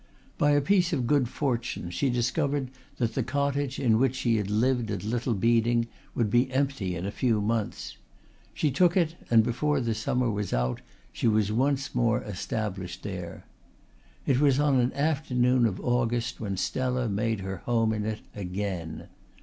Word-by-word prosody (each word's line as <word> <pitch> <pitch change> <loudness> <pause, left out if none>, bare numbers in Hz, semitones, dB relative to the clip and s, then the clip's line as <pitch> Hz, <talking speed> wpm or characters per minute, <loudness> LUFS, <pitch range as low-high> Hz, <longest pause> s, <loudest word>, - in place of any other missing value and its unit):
By 145 0 +4
a 145 - +4
piece 180 +3 +2
of 130 -5 0
good 135 -2 +2
fortune 120 -10 -2
she 135 +9 0
discovered 130 +2 0 0.3
that 115 -3 0
the 135 - 0
cottage 140 +2 -1
in 115 -4 +3
which 130 0 +2
she 120 -3 +1
had 105 -2 -2
lived 120 +2 +1
at 100 -1 -3
Little 120 +2 -1
Beeding 115 +2 +2 0.3
would 110 -4 0
be 125 +3 +3
empty 135 -9 -1
in 85 +2 -4
a 100 - -2
few 115 -1 +1
months. 110 0 -2 0.5
She 150 - 0
took 175 +6 +3
it 165 -3 +2 0.2
and 115 -1 +6
before 140 +5 0
the 115 -3 0
summer 120 +3 0
was 105 -2 -3
out 60 0 0 0.3
she - - 0
was 105 -2 +2
once 135 +4 0
more 120 0 +1
established 100 -2 -4
there. 90 -4 -6 0.8
It 130 -2 +2
was 140 -2 +4
on 145 -3 +3
an 125 +1 +2
afternoon 130 -5 +2
of - - -4
August 120 -1 0
when 100 -4 -3
Stella 125 +4 -1
made 110 +1 -1
her 95 0 -4
home 115 +1 +1
in 105 -1 -2
it 110 -1 -3
again. 95 -3 -4
120 Hz, 175 wpm, -27 LUFS, 105-135 Hz, 0.8 s, and